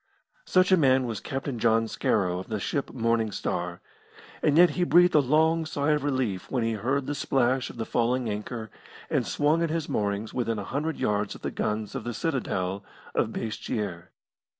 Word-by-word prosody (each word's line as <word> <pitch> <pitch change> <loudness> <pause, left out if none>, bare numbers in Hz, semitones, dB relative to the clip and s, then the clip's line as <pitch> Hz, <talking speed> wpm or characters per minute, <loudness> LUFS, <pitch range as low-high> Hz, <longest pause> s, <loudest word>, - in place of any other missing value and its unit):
Such 185 +1 +4
a 185 - +7
man 130 -4 +4
was 115 -3 -3
Captain 135 0 -4
John 115 0 +3
Scarrow, 90 -5 0
of 95 - -8
the 110 -2 -3
ship 140 +7 -2
Morning 115 -2 0
Star, 90 -2 -3 0.6
and 150 0 +3
yet 175 +1 +7
he 180 - 0
breathed 175 0 +5
a 150 - +6
long 160 +4 +3
sigh 150 -1 0
of 150 -2 +1
relief 130 -10 -1
when 125 -3 0
he 115 - +1
heard 130 +6 -1
the 145 - -2
splash 130 -2 +1
of - - -11
the 115 - -3
falling 120 +2 0
anchor 110 +1 -5 0.4
and - - +1
swung 150 +3 +2
at 165 - +1
his 165 -1 -2
moorings 105 +1 -2
within 115 -3 -1
a 100 - -3
hundred 150 +8 -2
yards 105 0 0
of - - -13
the - - -2
guns 105 0 -2
of - - -4
the 120 -1 -4
citadel 100 - -2 0.3
of - - +2
Basseterre. 105 -6 -4
120 Hz, 195 wpm, -27 LUFS, 105-145 Hz, 0.6 s, a